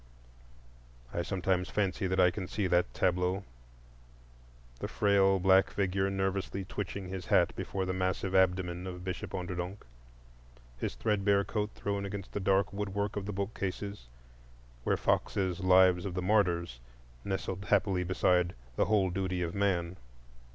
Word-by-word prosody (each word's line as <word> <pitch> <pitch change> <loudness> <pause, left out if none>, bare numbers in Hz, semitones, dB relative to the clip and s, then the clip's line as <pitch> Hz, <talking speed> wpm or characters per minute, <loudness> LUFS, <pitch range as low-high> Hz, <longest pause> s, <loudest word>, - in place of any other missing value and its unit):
I 85 - 0
sometimes 90 0 -1
fancy 95 -1 -1
I 90 -1 +4
can 95 0 -5
see 100 +1 -2
that 90 -7 +2
tableau: 90 +5 0 1.4
the - - -3
frail 100 -2 +3
black 95 +1 +5
figure, 95 0 0
nervously 95 0 -2
twitching 100 0 -5
his 95 -1 -6
hat - - +3
before 95 -1 -3
the 95 - -1
massive 95 +1 -1
abdomen 90 -1 +2
of 90 -1 -7
Bishop 90 -1 -4
Onderdonk; 90 +2 -4 0.9
his - - -3
threadbare 100 -2 +2
coat 105 0 -2
thrown 100 -1 -2
against 100 -1 -6
the - - -3
dark 95 0 +2
woodwork 100 0 -2
of 100 -1 -3
the - - -2
bookcases, 100 - -4 0.8
where - - +2
Fox's 95 -2 0
"Lives 95 -1 +5
of 95 -3 -4
the 90 - -2
Martyrs" 85 - +1 0.4
nestled 95 0 -3
happily 100 -3 +2
beside 90 -1 +2 0.2
"The - - +3
Whole 100 -3 +2
Duty 90 -1 -1
of 85 0 -3
Man." 95 -3 0
95 Hz, 140 wpm, -31 LUFS, 90-100 Hz, 1.4 s, black